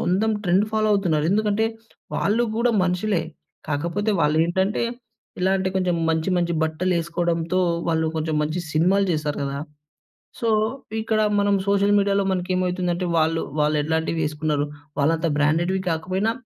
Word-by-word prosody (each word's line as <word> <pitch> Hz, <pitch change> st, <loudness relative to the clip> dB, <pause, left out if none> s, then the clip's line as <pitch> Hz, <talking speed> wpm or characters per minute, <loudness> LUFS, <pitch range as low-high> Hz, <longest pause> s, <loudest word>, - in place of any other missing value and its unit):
అందం 215 Hz, +5 st, +2 dB
trend 185 Hz, +3 st, +3 dB
follow 215 Hz, 0 st, +2 dB
అవుతున్నారు. 170 Hz, -7 st, +1 dB
ఎందుకంటే, 215 Hz, +1 st, +1 dB, 0.5 s
వాళ్ళు 220 Hz, +4 st, +1 dB
గూడా 235 Hz, +1 st, +2 dB
మనుషులే. 180 Hz, 0 st, 0 dB, 0.5 s
కాకపోతే, 170 Hz, +8 st, -1 dB
వాళ్ళేంటంటే, 170 Hz, +8 st, +1 dB, 0.6 s
ఇలాంటి 190 Hz, 0 st, +1 dB
కొంచెం 180 Hz, -2 st, +1 dB
మంచి, 160 Hz, +2 st, 0 dB
మంచి 175 Hz, -1 st, 0 dB
బట్టలేసుకోడంతో, 170 Hz, +1 st, 0 dB, 0.3 s
వాళ్ళు 160 Hz, -1 st, +1 dB
కొంచెం 155 Hz, -1 st, -1 dB
మంచి 155 Hz, +4 st, -2 dB
సినిమాలు 185 Hz, +6 st, +3 dB
చేశారు 150 Hz, -1 st, -2 dB
గదా! 140 Hz, 0 st, -3 dB, 0.8 s
సో, 230 Hz, -, 0 dB, 0.5 s
ఇక్కడా 215 Hz, -1 st, +1 dB, 0.2 s
మనం 200 Hz, 0 st, +2 dB
సోషల్ 200 Hz, 0 st, +3 dB
మీడియాలో 200 Hz, 0 st, +2 dB
మనకేమయితుందంటే, 180 Hz, -1 st, -1 dB
వాళ్ళు 160 Hz, +1 st, +1 dB, 0.2 s
వాళ్ళెట్లాంటివేసుకున్నారు, 150 Hz, 0 st, 0 dB, 0.3 s
వాళ్ళంత 160 Hz, +3 st, +1 dB
బ్రాండెడ్‌వి 170 Hz, +6 st, +1 dB
కాకపోయినా, 185 Hz, +7 st, 0 dB
175 Hz, 115 wpm, -23 LUFS, 160-195 Hz, 0.8 s, trend